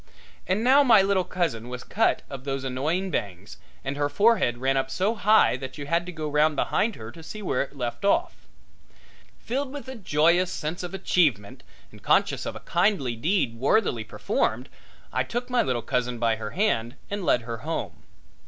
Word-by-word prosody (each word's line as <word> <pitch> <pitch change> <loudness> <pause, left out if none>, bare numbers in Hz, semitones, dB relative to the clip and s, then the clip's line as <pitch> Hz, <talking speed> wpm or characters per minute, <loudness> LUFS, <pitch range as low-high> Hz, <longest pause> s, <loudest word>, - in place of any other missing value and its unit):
And 190 +4 +1
now 265 +4 +6
my 225 -8 +6
little 195 -1 +2
cousin 135 -12 -2
was 125 0 -7
shut 225 - +2
of 135 -2 -8
those 135 -1 -3
annoying 155 +9 -1
bangs, 100 - -4 0.3
and 135 +1 -3
her 145 0 0
forehead 205 - +3
ran 135 +2 +1
up 135 0 0
so 190 +11 0
high 215 - +4
that 130 +1 -8
you 145 - -6
had 170 +4 0
to - - -4
go 155 -3 -5
round 150 +1 +2
behind 220 +7 0
her 110 0 -9
to 165 - -12
see 210 +6 -8
where 135 - 0
it 140 +1 -5
left 120 +2 -4
off. 335 - 0 0.9
Filled 265 +3 -3
with 285 -1 -8
a 260 - -6
joyous 175 - +2
sense 155 +3 -4
of 180 +1 -5
achievement 150 - +1 0.3
and - - -15
conscious - - +2
of - - -4
a - - -8
kindly 170 - +1
deed 135 - 0
worthily 135 - +2
performed, - - -2 0.4
I - - +1
took 245 +1 -4
my 245 -1 +3
little 125 -3 -1
cousin 125 -1 -1
by 115 -1 +1
her 110 -1 -5
hand 120 - 0 0.2
and 205 -1 -3
led 125 -8 +2
her 115 0 -5
home. - - -5
155 Hz, 190 wpm, -25 LUFS, 125-200 Hz, 0.9 s, now